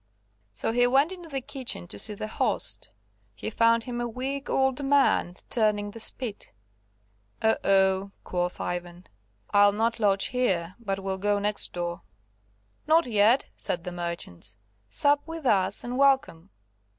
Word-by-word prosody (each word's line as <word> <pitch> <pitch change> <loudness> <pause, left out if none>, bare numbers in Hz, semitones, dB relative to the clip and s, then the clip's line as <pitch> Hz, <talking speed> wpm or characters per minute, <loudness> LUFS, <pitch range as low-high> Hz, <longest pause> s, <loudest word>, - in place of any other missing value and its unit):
So 105 - -2
he 245 +1 +3
went 275 +7 +3
into 350 -3 -9
the 270 -2 -3
kitchen 260 - -3
to 100 - 0
see 210 - +5
the 210 - -5
host; 215 - -2 0.5
he - - -5
found 230 0 +3
him 240 0 -4
a 240 - -1
weak 265 +4 -4
old 265 +1 +1
man 275 -10 +2
turning 210 -3 0
the 230 - -10
spit. 225 - -1 0.9
"Oh! 220 0 +3
oh!" 190 0 +2
quoth 180 0 -3
Ivan, 175 0 -5 0.5
"I'll 205 0 +5
not 225 +3 0
lodge 200 -2 +2
here, 185 -9 0
but 195 -4 -3
will 190 0 -3
go 205 +1 +1
next 205 +1 0
door." 175 -1 -4 0.9
"Not 325 +2 +4
yet," 225 +2 +3
said 170 - -2
the 180 - -5
merchants, 170 - -6 0.3
"sup 285 - +3
with 325 -2 -7
us, 195 -6 +2
and 245 +2 -4
welcome." 265 -11 +2
215 Hz, 150 wpm, -26 LUFS, 190-255 Hz, 0.9 s, see